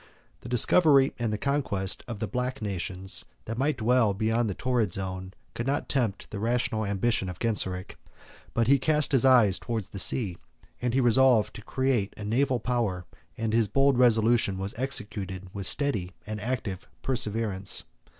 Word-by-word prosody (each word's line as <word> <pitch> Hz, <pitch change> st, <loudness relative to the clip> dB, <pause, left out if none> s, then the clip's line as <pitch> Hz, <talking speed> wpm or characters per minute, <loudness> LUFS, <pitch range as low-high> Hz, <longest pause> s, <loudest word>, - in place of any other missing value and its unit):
The 120 Hz, -, -10 dB
discovery 140 Hz, +2 st, +4 dB
and 110 Hz, -3 st, -1 dB
conquest 115 Hz, -10 st, -2 dB
of 120 Hz, -3 st, -5 dB
the 110 Hz, -, -2 dB
Black 125 Hz, +3 st, -3 dB
nations, 95 Hz, -2 st, -4 dB, 0.2 s
that 115 Hz, +2 st, -4 dB
might 145 Hz, +1 st, +1 dB
dwell 115 Hz, -3 st, +2 dB
beneath 110 Hz, +3 st, +1 dB
the 100 Hz, -, -3 dB
torrid 120 Hz, -7 st, 0 dB
zone, 95 Hz, -1 st, -4 dB, 0.2 s
could 115 Hz, -, -4 dB
not 140 Hz, +1 st, -1 dB
tempt 120 Hz, -8 st, -1 dB
the 105 Hz, -, -4 dB
rational 115 Hz, -1 st, 0 dB
ambition 100 Hz, 0 st, 0 dB
of 90 Hz, -, -7 dB
Genseric; 95 Hz, -4 st, -2 dB, 0.6 s
but 115 Hz, -, +3 dB
he 140 Hz, +3 st, +4 dB
cast 150 Hz, +1 st, +1 dB
his 135 Hz, -2 st, +3 dB
eyes 115 Hz, -8 st, +5 dB
towards 115 Hz, -5 st, -4 dB
the 100 Hz, -, -6 dB
sea; 95 Hz, -4 st, +1 dB, 0.4 s
he 125 Hz, +1 st, 0 dB
resolved 120 Hz, -2 st, +4 dB
to -, -, -8 dB
create 125 Hz, -3 st, -1 dB
a 105 Hz, -, -7 dB
naval 125 Hz, +4 st, +1 dB
power, 110 Hz, -7 st, -1 dB, 0.3 s
and 110 Hz, -1 st, -2 dB
his 115 Hz, -2 st, +3 dB
bold 135 Hz, +4 st, +3 dB
resolution 115 Hz, -4 st, +3 dB
was 95 Hz, +3 st, -4 dB
executed 100 Hz, -8 st, -3 dB
with 100 Hz, -2 st, -2 dB
steady 105 Hz, -12 st, 0 dB
and 110 Hz, 0 st, -5 dB
active 110 Hz, -5 st, -4 dB, 0.2 s
perseverance. 110 Hz, -6 st, 0 dB
115 Hz, 160 wpm, -27 LUFS, 100-125 Hz, 0.6 s, eyes